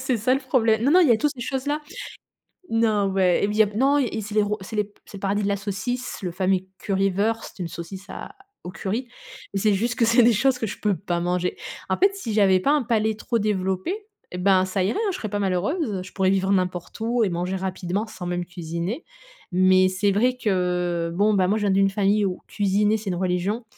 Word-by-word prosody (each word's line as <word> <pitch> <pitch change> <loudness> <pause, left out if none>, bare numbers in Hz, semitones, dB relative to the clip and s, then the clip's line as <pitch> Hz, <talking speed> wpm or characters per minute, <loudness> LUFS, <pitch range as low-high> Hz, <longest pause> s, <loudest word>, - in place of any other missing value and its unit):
C'est 260 -1 0
ça 230 +4 +1
le 270 - +2
problè 235 -4 +2
non, 245 +6 +1
non 360 +4 +6
il 330 - +5
y - - +7
a - - +4
tout 295 - +2
ces 245 - -10
choses-là. 270 +4 -2 0.9
Non 220 -3 +2
ouais, 185 -2 +2
il 205 +1 0
y 220 - +5
a - - +6
non 275 +5 +3
et 270 - +2
et 220 - -2
c'est 210 +1 -7
les 215 - +5
ro 210 +1 -1
c'est 210 +3 -7
les 210 0 -1
c'est 200 - -10
le - - -10
paradis 205 +1 0
de 200 - 0
la 200 - 0
saucisse, 215 +6 -4
le 180 - -3
fameux 185 +1 +1 0.2
Currywurst, 200 +3 0
c'est 180 - -4
une - - -3
saucisse 185 +4 -8
à - - -8 0.3
au 180 - -6
curry 220 +7 -3 0.5
et 195 - -1
c'est 210 +1 +3
juste 235 +4 0
que 235 - +1
c'est 230 +1 +5
des 235 0 +5
choses 255 +4 +2
que 225 - -2
je 205 - -7
peux 205 -3 +1
pas 175 -2 -2
manger. 180 +1 -1 0.3
En - - +1
fait, 395 +1 +3
si 235 - -4
j'avais 195 -3 +4
pas 280 - +2
un 295 -3 +2
palais 220 -1 +1
trop 230 +2 -2
développé 190 - -1 0.4
et 180 - -5
ben, 185 0 +3
ça 185 0 -1
irait, 210 - 0
hein, 435 -3 0
je - - -4
serais 215 - -5
pas 205 0 -2
malheureuse. 200 - -1
Je 185 - -12
pourrais 190 -1 +1
vivre 190 0 +1
n'importe 185 0 -1
où 230 +1 +1
et 200 - +1
manger 180 +2 -2
rapidement 190 +1 -2
sans 215 -4 -8
même 175 0 -2
cuisiner. 175 - -5 0.5
Mais 185 +1 +5
c'est 195 +2 +1
vrai 250 +6 +2
que 180 -5 0
bon, 210 +3 +3
bah, 185 -2 +3
moi, 210 +3 +2
je - - -3
viens 200 - +2
d'une 195 0 +4
famille 205 +1 +2
où 185 -2 -3
cuisiner, 205 +2 +1
c'est 205 -2 -5
une 180 - -1
religion. 185 +5 -1
200 Hz, 245 wpm, -24 LUFS, 185-225 Hz, 0.9 s, y